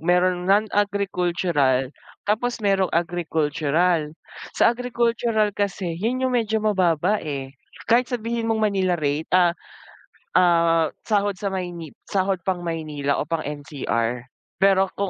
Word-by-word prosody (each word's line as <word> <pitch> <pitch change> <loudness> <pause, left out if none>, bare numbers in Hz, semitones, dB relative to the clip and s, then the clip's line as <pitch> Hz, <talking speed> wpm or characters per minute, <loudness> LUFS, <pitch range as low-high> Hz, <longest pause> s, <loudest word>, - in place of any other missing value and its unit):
merong 180 +2 +1
non-agricultural 180 -9 +1 0.3
tapos 235 +4 0
merong 195 -3 +1
agricultural. 165 -1 0 0.5
Sa - - +5
agricultural 235 -3 0
kasi 195 -3 -2
'yun 235 +9 -1
'yung 255 - -1
medyo 220 -2 +1
mababa 185 -1 +2
eh, 135 -3 -5 0.3
kahit 240 +2 +3
sabihin 230 -1 -2
mong 220 -1 +1
Manila 190 -3 +1
rate, 150 +1 -1
a 180 -2 +4 0.9
a 185 - +6 0.6
sahod 205 -2 +1
sa 200 - -2
Mayni 175 -4 -5 0.2
sahod 195 0 0
pang 185 -2 -1
Manila 155 -4 -2
o - - -2
pang 165 -1 -2
NCR, 135 -5 -3 0.4
pero 195 0 +5
kung 200 -1 -2
185 Hz, 125 wpm, -23 LUFS, 160-210 Hz, 0.9 s, a